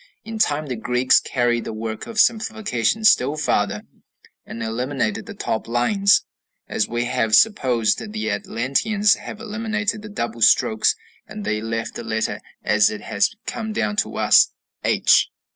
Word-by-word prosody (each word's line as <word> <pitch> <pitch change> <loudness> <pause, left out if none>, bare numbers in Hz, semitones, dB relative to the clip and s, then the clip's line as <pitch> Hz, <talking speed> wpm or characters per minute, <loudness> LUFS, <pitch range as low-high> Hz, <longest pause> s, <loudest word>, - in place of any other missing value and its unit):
In 225 -1 -7
time 155 -6 +1
the 130 -3 -4
Greeks 125 +3 +3
carried 120 -2 0
the - - -6
work 110 0 -5
of 225 -2 -4
simplification 220 - +1
still 145 -6 +4
farther, 105 -8 0 0.6
and 115 - -6
eliminated 135 - -2
the 220 - -8
top 110 - -3
lines, 195 - +2 0.4
as - - -1
we 120 +1 -2
have 115 -3 +1
supposed 125 - +2
the 110 0 -3
Atlanteans 140 - +1
to - - -5
have 210 - -9
eliminated 215 -1 -3
the 210 - -9
double 120 - -4
strokes, 110 0 +4 0.3
and 210 +1 -8
they 105 0 -1
left 115 0 -4
the - - -7
letter 110 0 -2 0.2
as 105 -1 +3
it 105 -1 -6
has 105 - 0
come 220 -2 -4
down 210 - -1
to 205 - -1
us, - - +5 0.4
H. - - +3
125 Hz, 160 wpm, -21 LUFS, -, 0.6 s, us